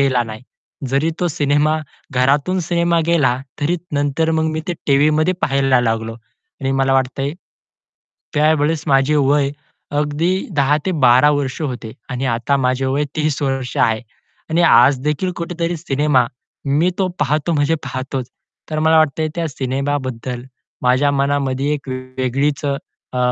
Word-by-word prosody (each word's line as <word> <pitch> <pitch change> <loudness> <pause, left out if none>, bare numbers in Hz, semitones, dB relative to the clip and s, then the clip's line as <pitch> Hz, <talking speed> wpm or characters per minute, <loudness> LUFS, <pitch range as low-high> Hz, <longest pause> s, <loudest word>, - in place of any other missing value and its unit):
गेला 130 -3 +3
नाही. 110 0 -8 0.5
जरी 140 +5 +1
तो 175 - +2
सिनेमा 150 0 +1 0.3
घरातून 140 +8 +2
सिनेमा 170 -1 +2
गेला 145 -8 +3 0.2
तरी 165 +5 +1 0.2
नंतर 145 +3 +1
मग 160 - +1
मी 155 - -2
ते - - +1
टीव्हीमध्ये 150 +4 +3
पाहायला 135 -2 +2
लागलो 115 -1 -1
आणि 120 +3 -8
मला 135 0 +2
वाटतंय, 135 +1 0 1.0
त्यावेळेस 155 0 +2
माझे 135 +2 +3
वय 140 0 +3 0.5
अगदी 150 +4 0 0.3
10 145 +1 +3
ते - - +2
12 130 +4 +6
वर्ष 145 -1 -1
होते 125 -6 -4 0.2
आणि 125 +2 -3
आता 120 +4 +1
माझे 130 0 0
वय 140 +3 +1
30 155 -2 0
वर्ष 135 -2 -2
आहे. 110 -1 +2 0.5
आणि 165 +2 +3
आज 130 0 +6
देखील 150 +5 0
कुठेतरी 170 0 -2
सिनेमा, 145 -4 +1 0.4
मी 150 +6 +2
तो 190 -2 +1
पाहतो 150 +4 +1
म्हणजे 145 +1 +2
पाहतोच, 130 -1 -4 0.4
तर 155 - -1
मला 160 +1 +4
वाटतंय 155 0 +2
त्या 165 -1 -1
सिनेमाबद्दल 130 -3 -3 0.4
माझ्या 130 +3 +3
मनामध्ये 140 0 0
एक 140 -2 -8
वेगळीच 130 +3 -2 0.5
अ, - - -1
140 Hz, 140 wpm, -19 LUFS, 130-155 Hz, 1.0 s, 12